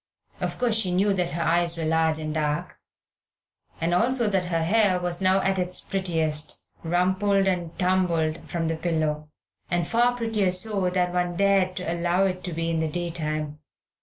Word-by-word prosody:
Of -, -, -3 dB
course, 235 Hz, -3 st, +2 dB
she 195 Hz, -5 st, 0 dB
knew 195 Hz, +3 st, +2 dB
that 180 Hz, -2 st, 0 dB
her 170 Hz, 0 st, -2 dB
eyes 170 Hz, 0 st, +2 dB
were 165 Hz, -, -2 dB
large 160 Hz, 0 st, +2 dB
and 155 Hz, -1 st, -4 dB
dark, 150 Hz, -1 st, -2 dB, 1.0 s
also 225 Hz, +9 st, +1 dB
that 190 Hz, -2 st, +1 dB
her 165 Hz, -2 st, 0 dB
hair 195 Hz, 0 st, +3 dB
was 175 Hz, 0 st, -3 dB
now 190 Hz, +1 st, +3 dB
at 190 Hz, 0 st, 0 dB
its 180 Hz, 0 st, -1 dB
prettiest, 160 Hz, -5 st, -2 dB, 0.2 s
rumpled 190 Hz, +4 st, +1 dB
and 175 Hz, -3 st, -2 dB
tumbled 175 Hz, -4 st, +1 dB
from 170 Hz, -1 st, -2 dB
the 165 Hz, 0 st, -1 dB
pillow, 155 Hz, -3 st, -1 dB, 0.4 s
and 175 Hz, -1 st, 0 dB
far 240 Hz, +4 st, +2 dB
prettier 220 Hz, -5 st, +1 dB
so 190 Hz, 0 st, 0 dB
than 180 Hz, -1 st, 0 dB
one 175 Hz, -1 st, 0 dB
dared 195 Hz, -1 st, +2 dB
to 180 Hz, -, -4 dB
allow 175 Hz, +2 st, +1 dB
it 185 Hz, -1 st, -2 dB
to 180 Hz, -, -3 dB
be 165 Hz, 0 st, -2 dB
in 165 Hz, -, 0 dB
the 160 Hz, -1 st, 0 dB
daytime. 155 Hz, -3 st, -3 dB
180 Hz, 175 wpm, -25 LUFS, 165-190 Hz, 1.0 s, hair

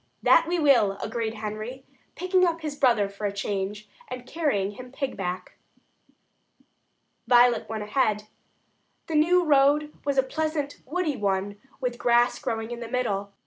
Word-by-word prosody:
"That 330 Hz, -, +5 dB
we 355 Hz, -, +1 dB
will," 255 Hz, -11 st, +4 dB
agreed 220 Hz, +1 st, -3 dB
Henry, 215 Hz, +4 st, -6 dB, 0.3 s
picking 365 Hz, +1 st, +2 dB
up 335 Hz, -2 st, +1 dB
his 305 Hz, -2 st, -4 dB
brother 240 Hz, -8 st, +3 dB
for 200 Hz, +1 st, -4 dB
a -, -, -2 dB
change, 200 Hz, +1 st, -3 dB, 0.2 s
and 250 Hz, -1 st, -7 dB
carrying 250 Hz, -, -1 dB
him 250 Hz, +4 st, -11 dB
"pig 270 Hz, 0 st, -3 dB
back." 180 Hz, -1 st, -5 dB, 1.7 s
Violet 245 Hz, -1 st, +4 dB
went 220 Hz, -1 st, -3 dB
ahead. 210 Hz, -1 st, +1 dB, 0.8 s
The 325 Hz, -, -6 dB
new 345 Hz, +4 st, +4 dB
road 295 Hz, 0 st, +3 dB
was 280 Hz, -1 st, -1 dB
a 265 Hz, -, +5 dB
pleasant 305 Hz, +1 st, -3 dB
woody 310 Hz, -2 st, -1 dB
one, 200 Hz, 0 st, -2 dB, 0.2 s
with 250 Hz, -2 st, -3 dB
grass 240 Hz, +1 st, +3 dB
growing 225 Hz, +1 st, -3 dB
in 240 Hz, -, -5 dB
the 235 Hz, -1 st, -7 dB
middle. 205 Hz, -5 st, -1 dB
245 Hz, 150 wpm, -26 LUFS, 210-290 Hz, 1.7 s, That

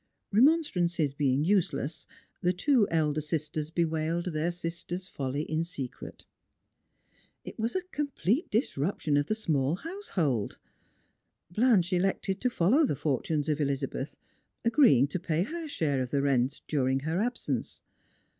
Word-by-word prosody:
Remonstrance 220 Hz, -, +3 dB, 0.2 s
being 140 Hz, -1 st, +1 dB
useless, 160 Hz, -5 st, 0 dB, 0.3 s
the 180 Hz, +1 st, +2 dB
two 230 Hz, +4 st, +3 dB
elder 155 Hz, -2 st, +1 dB
sisters 155 Hz, 0 st, -2 dB
bewailed 165 Hz, +1 st, -1 dB
their 155 Hz, +2 st, 0 dB
sister's 175 Hz, +1 st, -5 dB
folly 140 Hz, -2 st, -3 dB
in 160 Hz, +1 st, -1 dB
secret. 140 Hz, -7 st, -7 dB, 1.2 s
It -, -, -9 dB
was 230 Hz, +6 st, -1 dB
a 375 Hz, -, 0 dB
complete 285 Hz, -, -1 dB
disruption 165 Hz, -, 0 dB
of 145 Hz, 0 st, +2 dB
the 215 Hz, -, 0 dB
small 155 Hz, -8 st, 0 dB
household. 185 Hz, -, -2 dB, 0.9 s
Blanche 205 Hz, -3 st, +3 dB
elected 190 Hz, +1 st, 0 dB
to 250 Hz, -, +2 dB
follow 235 Hz, -, +3 dB
the 260 Hz, -, +1 dB
fortunes 150 Hz, +2 st, -1 dB
of 150 Hz, -1 st, 0 dB
Elizabeth, 140 Hz, 0 st, -2 dB, 0.5 s
agrtieing 230 Hz, -, +5 dB
to 185 Hz, -, -1 dB
pay 165 Hz, -1 st, 0 dB
her 325 Hz, -, -5 dB
share 145 Hz, -, 0 dB
of 125 Hz, -, -3 dB
the 140 Hz, +1 st, 0 dB
rent 135 Hz, 0 st, +1 dB
during 135 Hz, -2 st, +1 dB
her 160 Hz, +5 st, -1 dB
ab 245 Hz, +2 st, -1 dB
sence. -, -, -4 dB
165 Hz, 135 wpm, -29 LUFS, 145-205 Hz, 1.2 s, agrtieing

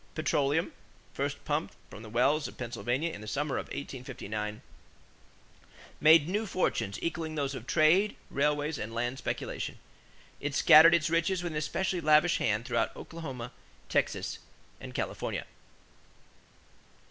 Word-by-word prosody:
Petroleum, 150 Hz, 0 st, +1 dB, 0.4 s
first -, -, -3 dB
pumped -, -, -2 dB, 0.2 s
from 105 Hz, -, -9 dB
the 110 Hz, -, -10 dB
wells 140 Hz, +7 st, +2 dB
of -, -, -12 dB
Pennsylvania 120 Hz, +6 st, -2 dB
in 105 Hz, -, -8 dB
the 110 Hz, -, -9 dB
summer 140 Hz, +5 st, -1 dB
of -, -, -6 dB
1859, 110 Hz, -6 st, -6 dB, 1.4 s
made 155 Hz, 0 st, +7 dB
new 210 Hz, +4 st, -1 dB
fortunes 115 Hz, -, -1 dB
equaling 165 Hz, -2 st, -3 dB
those 140 Hz, -2 st, -1 dB
of 130 Hz, -, -8 dB
trade, 175 Hz, +7 st, +4 dB, 0.2 s
railways, 150 Hz, +1 st, 0 dB
and 115 Hz, +1 st, -5 dB
land 120 Hz, +3 st, -2 dB
speculation. -, -, -4 dB, 0.6 s
It 145 Hz, -1 st, -3 dB
scattered 165 Hz, +3 st, +8 dB
its 165 Hz, -1 st, 0 dB
riches 170 Hz, +2 st, +1 dB
with 175 Hz, -, -3 dB
an 155 Hz, -, -3 dB
especially 180 Hz, +3 st, -1 dB
lavish 155 Hz, +2 st, +4 dB
hand 105 Hz, +2 st, 0 dB
through 125 Hz, -, 0 dB, 0.2 s
Oklahoma, 135 Hz, -8 st, -7 dB, 0.4 s
Texas, -, -, -1 dB, 0.4 s
and -, -, -9 dB
California. -, -, -3 dB
145 Hz, 135 wpm, -30 LUFS, 120-165 Hz, 1.4 s, scattered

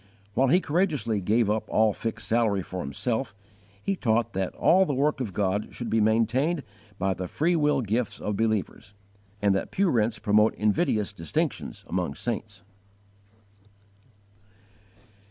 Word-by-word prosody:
_ -, -, -30 dB, 0.3 s
While 130 Hz, +5 st, +3 dB
he 175 Hz, +8 st, +5 dB
courageously 145 Hz, -, 0 dB
gave 110 Hz, +4 st, +2 dB
up 105 Hz, +1 st, 0 dB
all 110 Hz, -1 st, +3 dB
fixed 115 Hz, +1 st, -4 dB
salary 110 Hz, -4 st, +2 dB
for 90 Hz, -, -6 dB
himself, 110 Hz, -, -3 dB, 0.5 s
he 195 Hz, -, 0 dB
taught 115 Hz, -, 0 dB
that 95 Hz, -1 st, -2 dB
all 185 Hz, +3 st, +5 dB
the 145 Hz, -7 st, -1 dB
work 145 Hz, +1 st, +1 dB
of 115 Hz, -6 st, -3 dB
God 100 Hz, +1 st, -1 dB
should 120 Hz, -, -5 dB
be 110 Hz, 0 st, +3 dB
maintained 120 Hz, +9 st, +2 dB, 0.3 s
by 95 Hz, 0 st, 0 dB
the 90 Hz, 0 st, -5 dB
freewill 150 Hz, -, +1 dB
gifts 115 Hz, +1 st, -2 dB
of 105 Hz, -, -2 dB
believers, 105 Hz, -2 st, -2 dB, 0.5 s
and 100 Hz, -1 st, +4 dB
that 95 Hz, -, -1 dB
pew 195 Hz, -3 st, +1 dB
rents 115 Hz, -1 st, +1 dB
promote 105 Hz, 0 st, +3 dB
invidious 105 Hz, -1 st, +1 dB
distinctions 80 Hz, -6 st, -3 dB
among 70 Hz, -, -2 dB
saints. 105 Hz, -2 st, -5 dB
110 Hz, 145 wpm, -26 LUFS, 100-135 Hz, 0.5 s, he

